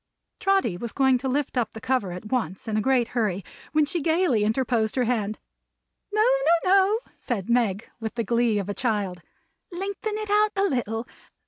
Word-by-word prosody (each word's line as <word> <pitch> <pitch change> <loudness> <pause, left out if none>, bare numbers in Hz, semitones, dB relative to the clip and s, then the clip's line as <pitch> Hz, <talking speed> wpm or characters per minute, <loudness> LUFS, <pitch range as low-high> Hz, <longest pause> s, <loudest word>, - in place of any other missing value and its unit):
Trotty 390 - +2
was 235 +3 -5
going 265 -2 +3
to 265 - -3
lift 275 +2 -1
up 235 -3 0
the 220 - -7
cover 250 -7 0
at 180 +4 -8
once, 225 -6 -2
in 220 - -1
a 215 - +2
great 255 -1 +2
hurry, 205 -6 -1 0.3
when 305 -1 +3
she 335 +3 -2
gayly 320 - +2
interposed 220 0 +1
her 255 - +2
hand. 215 -3 -1 0.7
"No, 425 +1 +3
no, 425 -9 +3
no," 395 +3 +4 0.2
said 235 -2 -3
Meg, 225 -4 +1
with 225 -1 -5
the 230 - 0
glee 235 0 +2
of 200 -2 -2
a 205 - -2
child. 205 -7 -1 0.5
"Lengthen 400 +4 -3
it 430 -1 -4
out 420 0 +3
a 395 - +1
little. 230 - -2
245 Hz, 190 wpm, -25 LUFS, 215-340 Hz, 0.7 s, no